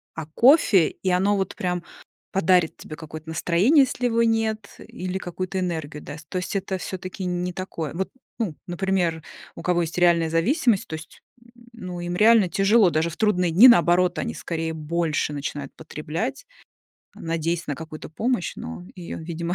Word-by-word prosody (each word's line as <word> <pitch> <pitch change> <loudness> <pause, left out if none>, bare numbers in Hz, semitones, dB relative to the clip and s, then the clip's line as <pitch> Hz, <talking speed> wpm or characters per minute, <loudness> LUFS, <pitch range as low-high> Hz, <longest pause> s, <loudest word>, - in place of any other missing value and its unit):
о 160 - -5
кофе, 225 - +5
и 190 - -4
оно 190 +3 +2
вот, 190 -1 -2
прям, 180 -1 -2 0.5
подарит 180 -3 +3
тебе 155 - -9
какое-то 155 0 -10
настроение, 180 - +4
если 250 -1 -4
его 230 -1 +2
нет, 220 -2 0
или 185 +1 -5
какую-то 185 +1 -4
энергию 160 -5 -4
даст. 155 +1 -10
То 185 - -3
есть 180 +2 -4
это 195 -1 -2
всё-таки 185 0 -6
не 180 0 -2
такое. 170 -5 -5
Вот, 190 +3 -2 0.3
ну, 200 -10 -2
например, 175 -2 0 0.3
у - - -8
кого 180 -1 +1
есть 165 0 -4
реальная 170 -2 +4
зависимость, 205 - +2
то - - -8
есть, 160 0 -12 0.2
м, 235 - -21 0.2
ну 180 -6 -7
им 175 0 -3
реально 215 0 +5
тяжело, 195 +2 +4
даже 160 +1 0
в 170 - -10
трудные 180 -5 +2
дни. 200 +10 +9
Наоборот, 180 -5 +4
они - - -3
скорее 165 -1 -3
больше 155 -1 -1
начинают 145 -1 -5
потреблять, 160 - -5 0.7
надеясь 165 +1 -2
на 145 - -2
какую-то 155 -1 -9
помощь, 225 +3 -1
но 80 +2 -7
её, 175 -2 -7
видимо, 170 +1 -4
175 Hz, 170 wpm, -24 LUFS, 160-195 Hz, 0.7 s, дни